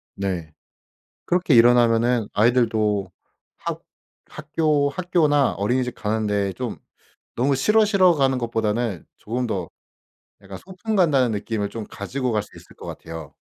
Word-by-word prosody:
네 90 -5 -4 0.7
그렇게 175 -4 +2
일어나면은 120 -1 +4
아이들도 110 -3 +1 0.5
학 - - -5 0.4
학교 150 -1 0
학교나 150 -4 +2
어린이집 125 +5 -1
가는데 105 -3 -1
좀 125 +2 -5 0.6
너무 135 +4 +2
"싫어, 210 +11 +3
싫어." 190 -4 +4
가는 135 -3 +1
것보다는 115 -4 -2
조금 125 +3 -3
더 95 -7 -3 0.7
약간 95 -1 -10
소풍 190 +4 -5
간다는 140 -10 +3
느낌을 105 0 -2
좀 110 +1 -6
가지고 125 +6 -4
갈 105 -1 0
수 105 - -15
있을 - - -15
것 - - -11
같아요. 80 -3 -8
120 Hz, 285 characters per minute, -22 LUFS, 105-145 Hz, 0.7 s, 일어나면은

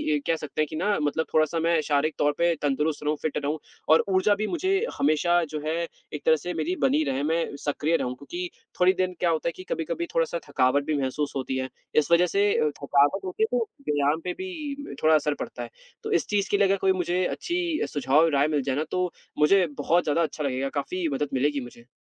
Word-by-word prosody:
इ - - 0
कह 165 - +3
सकते 155 -1 -4
हैं 155 - +1
कि 155 - -7
ना, 200 +6 +1
मतलब 150 +2 0
थोड़ा-सा 155 +1 +2
मैं 165 0 +2
शारीरिक 150 +1 +1
तौर 145 - +3
पे 170 0 +3
तंदुरुस्त 150 +2 0
रहूँ, 150 +1 +1
फ़िट 155 - -2
रहूँ, 145 +2 -1 0.3
और 160 - +6
ऊर्जा 195 +2 +3
भी 215 +1 -2
मुझे 375 - 0 0.2
हमेशा, 175 +4 +3
जो 155 -1 -5
है, 155 +1 0 0.4
एक 150 - -6
तरह 160 - +6
से 175 +4 -5
मेरी 360 - -1
बनी 290 +4 +3
रहे। 135 - -1
मैं 165 +2 +1 0.2
सक्रिय 150 +2 +1
रहूँ, 125 0 -3
क्योंकि 175 +7 -6 0.3
थोड़ी 180 +1 +5
दिन 185 -1 -1
क्या 175 - +2
होता 160 0 0
है - - +1
कि 185 - -9
कभी-कभी 165 +1 -2
थोड़ा-सा 165 +1 +1
थकावट 135 +1 +2
भी 155 -1 0
महसूस 140 +2 -2
होती 130 -1 -2
है। 130 0 -3 0.3
इस 155 +2 +2
वजह 170 +1 +6
से 200 +1 +4
अ, 155 - +2
थकावट 145 +7 +3
होती 185 +4 -1
है, - - +3
तो 235 - +1 0.2
व्यायाम 145 +1 +2
पे 180 - -2
भी 300 -6 -6
थोड़ा 155 0 +6
असर 150 -1 +1
पड़ता - - -5
है। - - -8 0.3
तो 435 - -4
इस 380 - +1
चीज़ 200 -2 0
के 205 - +4
लिए 200 -1 +4
अगर 195 +1 +2
कोई 190 0 +2
मुझे 180 0 0
अच्छी 345 - -2
सुझाव 135 0 +1
और 165 0 +4
राय 140 +1 +3
मिल 150 -2 0
जाए 135 0 -1
ना, 150 - 0
तो 180 -1 0 0.3
मुझे 180 +5 +5
बहुत 170 +4 +2
ज़्यादा 150 +2 +1
अच्छा 155 -1 -3
लगेगा। 135 0 -1
काफ़ी 170 +5 -2
मदद 140 +1 -1
मिलेगी 145 +2 +1
मुझे। 120 -1 -12
160 Hz, 235 wpm, -26 LUFS, 145-185 Hz, 0.4 s, और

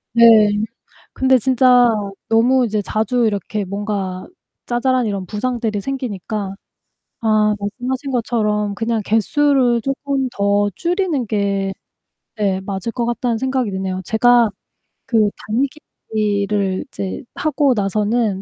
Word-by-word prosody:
네. 235 0 +7 0.9
근데 260 0 +3
진짜 250 -1 +4 0.4
너무 245 +3 +3
이제 210 -1 -1
자주 220 +4 0
이렇게 205 0 -2
뭔가 195 -1 -4 0.4
자잘한 250 0 +1
이런 200 -3 -3
부상들이 225 0 -2
생기니까 210 -5 -4 0.7
아 215 -2 +2
말씀하신 255 +6 -4
것처럼 210 -4 0
그냥 225 +1 -1
개수를 245 +3 +2
쪼끔 275 0 -2
더 205 -1 +1
줄이는 345 - -1
게 200 -2 -1 0.7
예 195 -3 +1
맞을 195 +2 -3
것 240 - -2
같다는 240 0 -1
생각이 260 -2 -1
드네요. 190 -1 -3
제가 240 0 +4 0.6
그 220 -3 +3 0.8
달리기를 200 -2 0
이제 195 -6 -5
하고 290 -3 +1
나서는 210 0 0
220 Hz, 250 characters per minute, -19 LUFS, 205-250 Hz, 0.9 s, 네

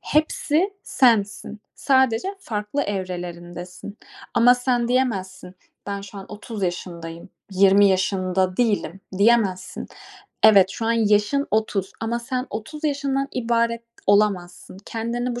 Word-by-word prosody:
Hepsi 310 +4 +1
sensin. 210 -4 +1
Sadece 260 +1 +2
farklı 210 - -3
evrelerindesin. 180 0 -6 0.4
Ama 245 +1 +6
sen 245 -1 0
diyemezsin: 190 -8 -1 0.3
"Ben 200 0 -3
şu 200 0 -10
an 190 - -8
30 210 0 -7
yaşındayım, 170 -2 -5 0.2
20 195 +1 +5
yaşında 185 -1 0
değilim." 205 -6 0 0.2
diyemezsin. 205 -4 +2 0.6
Evet, 200 -3 +7
şu 225 +2 -4
an 230 - +3
yaşın 220 +5 +2
30 210 -2 -1
ama 230 +1 -1
sen 255 +2 -3
30 300 +9 -7
yaşından 275 -2 0
ibaret 235 -1 0 0.2
olamazsın. 190 -3 +1
Kendini 240 +2 -3
bu - - -4
210 Hz, 115 wpm, -23 LUFS, 190-240 Hz, 0.6 s, Evet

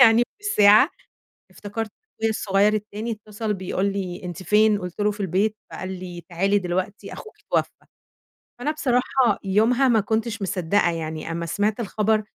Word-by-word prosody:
يعني 230 -1 +7 0.2
بالساعة، 215 - +6 0.6
افتكرت 215 +1 -5 0.3
أخويا 225 - +2
الصغير 205 -1 +2
التاني 215 +2 -3
اتصل 215 0 -4
بيقول 190 0 -2
لي: 185 -3 -4
"أنتِ 180 0 -6
فين؟" 210 +2 +4
قُلت 180 -1 -7
له: 210 0 +3
"في 210 - -10
البيت." 200 +3 +1 0.2
فقال 185 - -5
لي: 175 -1 -7
"تعالي 195 +4 +2
دلوقتي، 185 +3 -3
أخوكِ 435 - -10
اتوفى." - - -2 0.7
فأنا 290 +5 0
بصراحة 250 -6 +1
يومها 225 +7 +3
ما 235 -3 +4
كنتش 220 +1 -1
مِصدقة 185 -1 +1
يعني 160 0 -4
أمّا 170 0 -3
سمِعت 205 +6 0
الخبر 215 0 +1
210 Hz, 150 wpm, -23 LUFS, 185-220 Hz, 0.7 s, يعني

